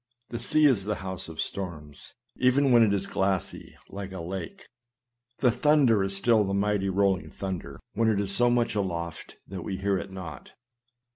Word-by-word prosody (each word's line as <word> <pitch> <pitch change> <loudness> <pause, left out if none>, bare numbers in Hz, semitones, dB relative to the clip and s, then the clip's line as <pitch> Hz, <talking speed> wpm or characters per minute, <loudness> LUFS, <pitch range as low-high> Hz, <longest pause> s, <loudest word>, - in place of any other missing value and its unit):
The 120 - -5
sea 155 +6 +3
is 120 -9 +3
the 105 0 -1
house 95 -3 -5
of 80 - -10
storms, 80 -7 -6 0.2
even 130 +2 +3
when 120 -1 +6
it 110 -3 +4
is 100 -1 0
glassy 95 -1 -2 0.2
as 100 -1 -6
a 95 - -7
lake; 95 - -6 0.8
the 125 - +5
thunder 125 -5 +3
is 95 0 -1
still 110 +1 +3
the 95 0 -2
mighty 100 -1 0
rolling 95 -4 +1
thunder, 95 +5 -6
when 115 +1 +2
it 105 -2 +1
is 100 -1 +5
so 120 0 +4
much 120 -2 +1
aloft 85 -5 -4
that 95 -1 -6
we 95 +2 -4
hear 100 0 0
it 95 +3 -8
not. 85 -7 -9
100 Hz, 185 wpm, -27 LUFS, 95-115 Hz, 0.8 s, when